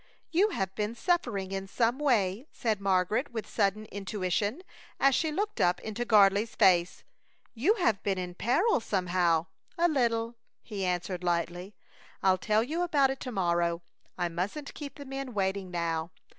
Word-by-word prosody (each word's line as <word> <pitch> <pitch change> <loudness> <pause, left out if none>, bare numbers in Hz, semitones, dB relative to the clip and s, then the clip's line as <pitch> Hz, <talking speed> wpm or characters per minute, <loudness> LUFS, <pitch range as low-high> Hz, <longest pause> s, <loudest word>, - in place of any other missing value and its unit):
"You 385 +6 +4
have 190 - -2
been 210 +2 -2
suffering 240 - 0
in 195 0 -4
some 235 +5 +1
way," 235 -4 +1
said 220 -4 -1
Margaret, 195 +7 +1
with 225 -2 -5
sudden 210 0 0
intuition, 205 - -2 0.4
as 275 0 +5
she 315 +3 +1
looked 415 +7 -2
up 175 0 +3
into 220 +2 -4
Gardley's 210 -1 +4
face. 175 -1 +3 0.5
"You 295 - +2
have 225 - +1
been 195 -2 -1
in 180 -1 -4
peril, 270 - +2
somehow 180 -5 +1 0.2
" - - -37
"A 345 +1 +4
little," 235 -6 0 0.3
he 205 -4 -5
answered, 180 0 -2
lightly. 175 +3 -2 0.5
"I'll 190 -1 +4
tell 215 +3 +2
you 315 +8 -2
about 290 -6 +3
it 270 - -5
to 255 - -5
morrow. 170 -4 0 0.3
I 175 - 0
mustn't 190 - -4
keep 285 -2 -8
the 285 - -9
men 270 -3 -6
waiting 190 -1 -1
now. 170 -2 -2
210 Hz, 165 wpm, -29 LUFS, 185-260 Hz, 0.5 s, as